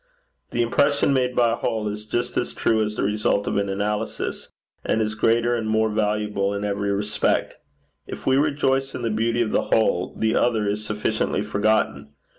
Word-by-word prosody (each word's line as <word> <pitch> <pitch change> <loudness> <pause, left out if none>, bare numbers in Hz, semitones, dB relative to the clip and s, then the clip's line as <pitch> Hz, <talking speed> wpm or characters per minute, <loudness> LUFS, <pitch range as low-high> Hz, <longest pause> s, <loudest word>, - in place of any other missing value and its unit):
The 120 - 0
impression 140 +4 +2
made 125 -2 +1
by 120 -1 +3
a - - +1
whole 110 -1 -2
is 105 +1 -5
just 120 +2 -2
as - - -2
true 110 -1 +2
as 105 0 -3
the - - -1
result 105 0 +1
of - - -2
an 100 0 0
analysis, 105 +2 -3 0.3
and - - 0
is 110 -1 0
greater 115 +2 +2
and 110 -2 -2
more 110 0 +2
valuable 105 -2 0
in 100 - -3
every 100 0 -1
respect. 105 +1 0 0.5
If - - -8
we 130 - +3
rejoice 135 -2 +1
in 120 - -5
the 115 - 0
beauty 115 +2 +1
of 110 - -3
the - - +2
whole, 95 -5 +1
the 110 +1 +1
other 110 -4 +2
is 105 +1 -1
sufficiently 105 0 -1
forgotten. 100 -9 0
110 Hz, 190 wpm, -23 LUFS, 105-115 Hz, 0.5 s, by